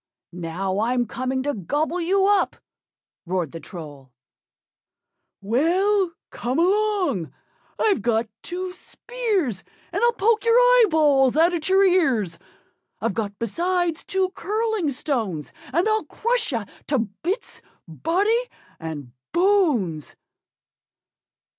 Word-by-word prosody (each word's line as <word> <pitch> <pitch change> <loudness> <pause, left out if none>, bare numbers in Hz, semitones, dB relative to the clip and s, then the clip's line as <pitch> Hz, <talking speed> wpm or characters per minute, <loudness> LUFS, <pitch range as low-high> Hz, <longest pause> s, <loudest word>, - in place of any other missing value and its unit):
"Now, 180 +3 -3
I'm 240 +2 +1
coming 255 +2 -2
to 290 +1 -1
gobble 295 - -1
you 385 +3 +2
up," 405 0 +3 0.7
roared 180 -4 -1
the 165 - -7
Troll. 145 -5 -10 1.3
"Well, 345 - +2 0.2
come 250 +3 -2
along! 375 - +1 0.5
I've 410 - +2
got 230 0 +1
two 365 +1 -4
spears, 390 - -2 0.3
And 380 +4 -2
I'll 475 0 +4
poke 450 +1 +2
your 460 0 +4
eyeballs 315 - +5
out 335 +3 +5
at 335 0 -2
your 385 +1 +5
ears; 260 - +2 0.6
I've 220 -1 -1
got 205 -1 -3
besides 340 - -1
two 380 -1 0
curling 425 -2 -1
stones, 220 - -2 0.2
And 340 +9 +2
I'll 435 0 +1
crush 470 -4 -1
you 230 -5 -2 0.2
to 280 - +1
bits, 245 - -4 0.3
body 400 - 0 0.3
and 150 -6 -6 0.2
bones." 315 - +2
315 Hz, 115 wpm, -23 LUFS, -, 1.3 s, eyeballs